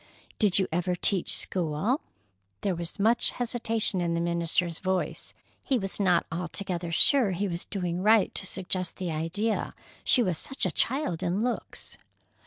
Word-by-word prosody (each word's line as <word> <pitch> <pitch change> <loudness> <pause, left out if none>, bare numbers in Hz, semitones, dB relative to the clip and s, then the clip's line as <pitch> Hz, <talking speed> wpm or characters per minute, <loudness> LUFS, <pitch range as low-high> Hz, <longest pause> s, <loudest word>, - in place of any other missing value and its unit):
"Did 205 -4 +3
you 190 -2 +2
ever 180 +2 0
teach 185 0 +3
school?" 185 - 0 0.6
There 195 - 0
was 170 -1 -4
much 225 +4 +3
hesitation 230 -5 0
in 170 -1 0
the - - 0
minister's 170 0 0
voice. 185 0 -2 0.3
He 270 - +1
was 195 -3 -4
not 180 -4 +3
altogether 175 +1 -3
sure 250 - +4
he 200 +3 -1
was 170 -1 -4
doing 180 -3 -3
right 215 0 +4
to 190 - -1
suggest 185 -1 -2
the 180 -3 -3
idea, 180 +8 -1 0.3
she 250 - +5
was 180 -6 0
such 270 -7 -2
a 185 - +1
child 230 - 0
in 185 +4 0
looks. 245 -1 -4
185 Hz, 160 wpm, -28 LUFS, 170-215 Hz, 0.6 s, she